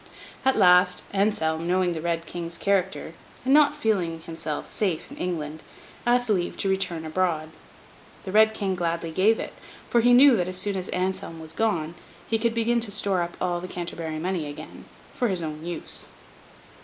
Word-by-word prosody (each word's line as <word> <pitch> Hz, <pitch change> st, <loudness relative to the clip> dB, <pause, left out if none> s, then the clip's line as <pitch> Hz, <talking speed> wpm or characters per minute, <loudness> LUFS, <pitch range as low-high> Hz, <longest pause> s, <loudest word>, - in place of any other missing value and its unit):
At 265 Hz, 0 st, +3 dB
last, 180 Hz, 0 st, +5 dB
Anselm, 170 Hz, -5 st, 0 dB
knowing 180 Hz, 0 st, +2 dB
the 160 Hz, -, -4 dB
Red 170 Hz, 0 st, -1 dB
King's 170 Hz, -1 st, -6 dB
character, 195 Hz, -1 st, 0 dB, 0.3 s
and 265 Hz, -, +3 dB
not 295 Hz, 0 st, +6 dB
feeling 185 Hz, -, 0 dB
himself 160 Hz, -2 st, -5 dB
safe 185 Hz, -7 st, -2 dB
in -, -, -10 dB
England, 155 Hz, -3 st, -4 dB, 0.5 s
asked 245 Hz, 0 st, +3 dB
leave 185 Hz, -5 st, 0 dB
to 195 Hz, -, 0 dB
return 185 Hz, -4 st, -1 dB
abroad. 160 Hz, -1 st, -1 dB, 0.7 s
The 190 Hz, -, -5 dB
Red 220 Hz, +1 st, +5 dB
King 195 Hz, -3 st, -1 dB
gladly 170 Hz, -2 st, -2 dB
gave 205 Hz, +7 st, +3 dB
it; -, -, -5 dB, 0.4 s
for 235 Hz, -, +4 dB
he 245 Hz, +1 st, +6 dB
knew 270 Hz, 0 st, +8 dB
that 180 Hz, -1 st, 0 dB
as 185 Hz, 0 st, -4 dB
soon 205 Hz, +1 st, -1 dB
as 185 Hz, -1 st, -4 dB
Anselm 180 Hz, -2 st, -2 dB
was 160 Hz, -1 st, -9 dB
gone, 175 Hz, -8 st, 0 dB, 0.3 s
he 225 Hz, -, 0 dB
could 230 Hz, 0 st, 0 dB
begin 235 Hz, +1 st, +2 dB
to 225 Hz, -3 st, 0 dB
store 200 Hz, -3 st, +2 dB
up 170 Hz, 0 st, -4 dB
all 175 Hz, -1 st, -1 dB
the 185 Hz, -, -6 dB
Canterbury 170 Hz, -3 st, -5 dB
money 170 Hz, -1 st, -2 dB
again, 145 Hz, -, -9 dB, 0.3 s
for 245 Hz, -, +1 dB
his 185 Hz, -5 st, -1 dB
own 155 Hz, 0 st, -5 dB
use. 170 Hz, -1 st, -4 dB
180 Hz, 180 wpm, -25 LUFS, 165-210 Hz, 0.7 s, knew